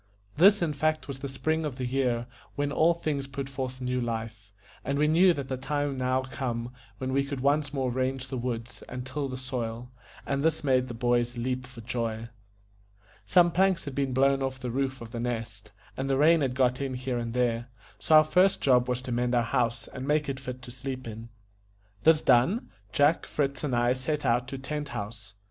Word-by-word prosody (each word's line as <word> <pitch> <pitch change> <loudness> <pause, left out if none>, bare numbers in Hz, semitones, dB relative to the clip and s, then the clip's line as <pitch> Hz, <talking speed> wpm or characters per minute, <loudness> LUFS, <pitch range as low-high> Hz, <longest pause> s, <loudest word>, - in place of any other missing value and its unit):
This 195 +3 +6
in 155 -3 0
fact 155 -1 0
was 135 -2 -6
the 140 - -4
spring 155 +4 -1
of 150 -4 -3
the 130 - -2
year, 125 -2 0 0.3
when 145 0 -1
all 165 +3 +4
things 145 -4 -2
put 135 0 -5
forth 130 -1 -5
new 125 0 -1
life; 110 -3 -4 0.3
and 140 - -1
we 150 +1 +3
knew 175 +4 +6
that 140 -5 -3
the 130 - -3
time 145 +2 -1
was 135 -2 -4
now 130 +1 +1
come 125 -2 -4 0.3
when 130 0 -3
we 140 +1 +3
could 140 -1 -4
once 145 +1 +2
more 135 -3 -1
range 130 +1 -1
the 130 - -3
woods 120 -1 -4
and 125 0 -5
till 140 +1 -3
the 130 - -5
soil, 125 -2 -4 0.3
and 140 0 -1
this 160 0 +1
made 130 -2 +2
the 120 - -6
boys 120 0 +1
leap 130 +1 -2
for 125 -2 -11
joy. 115 -1 -3 1.0
Some 175 -2 +5
planks 190 0 +2
had 140 - -5
been 135 -1 -1
blown 135 +1 +3
off 130 0 -2
the 125 -1 -4
roof 135 0 -2
of 115 -1 -8
The 115 - -4
Nest, 115 -3 -4 0.2
and 135 +1 -3
the 135 - +2
rain 160 +3 +5
had 130 -3 0
got 125 0 +2
in 135 -2 -2
here 125 -1 -2
and 115 0 -4
there; 120 -1 +1 0.3
so 155 - +4
our 155 - +9
first 180 +5 +3
job 125 -2 +3
was 125 0 -1
to 130 - -5
mend 120 +1 +1
our 120 - +3
house, 120 +1 0
and 130 +1 -7
make 150 0 +2
it 135 -1 -3
fit 125 -2 -7
to 120 - -8
sleep 130 0 -6
in. 115 +1 -8 0.7
This 160 +4 +5
done, 135 - +3 0.2
Jack, 145 +6 +3
Fritz, 140 -2 -1
and 135 -5 0
I 120 +1 +3
set 145 +4 -2
out 120 +1 +2
to 135 - -5
Tent 145 +2 -4
House. 105 -2 -7
130 Hz, 215 wpm, -28 LUFS, 120-140 Hz, 1.0 s, our